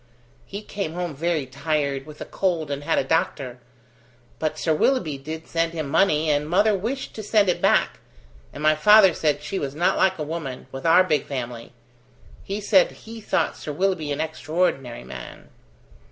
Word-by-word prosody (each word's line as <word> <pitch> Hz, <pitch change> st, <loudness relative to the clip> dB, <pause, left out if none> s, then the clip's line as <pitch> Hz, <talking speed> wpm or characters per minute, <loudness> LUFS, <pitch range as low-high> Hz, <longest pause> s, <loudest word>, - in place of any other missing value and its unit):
"He 200 Hz, +2 st, -7 dB
came 195 Hz, -6 st, -4 dB
home 175 Hz, -2 st, -3 dB
very 160 Hz, -1 st, -1 dB
tired, 140 Hz, 0 st, -2 dB
with 150 Hz, 0 st, -11 dB
a -, -, -4 dB
cold, 170 Hz, -6 st, -1 dB
and 140 Hz, 0 st, -3 dB
had -, -, +1 dB
a -, -, +2 dB
doctor. 130 Hz, -4 st, -1 dB, 0.8 s
But 155 Hz, -1 st, -2 dB
Sir 160 Hz, -, +1 dB
Willoughby 155 Hz, -, +1 dB
did 160 Hz, +3 st, -7 dB
send 165 Hz, 0 st, 0 dB
him 155 Hz, -3 st, -3 dB
money, 155 Hz, 0 st, +2 dB
and 150 Hz, +1 st, 0 dB
mother 205 Hz, +5 st, +4 dB
wished 240 Hz, +8 st, -4 dB
to 220 Hz, -, -6 dB
send 210 Hz, -2 st, +3 dB
it 180 Hz, -, 0 dB
back, -, -, +2 dB, 0.5 s
and 150 Hz, -, -8 dB
my 155 Hz, 0 st, +5 dB
father 195 Hz, +4 st, +6 dB
said 150 Hz, -3 st, 0 dB
she 195 Hz, -, -3 dB
was 140 Hz, 0 st, -4 dB
not 175 Hz, +3 st, +2 dB
like 190 Hz, 0 st, +3 dB
a 155 Hz, -, -3 dB
woman 150 Hz, -5 st, -5 dB
with 135 Hz, +4 st, -4 dB
our 175 Hz, +3 st, +7 dB
big 155 Hz, -5 st, 0 dB
family. 120 Hz, -4 st, -5 dB, 0.7 s
He 200 Hz, +2 st, -4 dB
said 200 Hz, -2 st, +4 dB, 0.2 s
he 225 Hz, 0 st, -9 dB
thought 170 Hz, -5 st, 0 dB
Sir 150 Hz, -, -6 dB
Willoughby 175 Hz, -2 st, -1 dB
an 145 Hz, -, -1 dB
extraordinary 155 Hz, -, -2 dB
man." 65 Hz, -, -10 dB
160 Hz, 180 wpm, -24 LUFS, 145-185 Hz, 0.8 s, our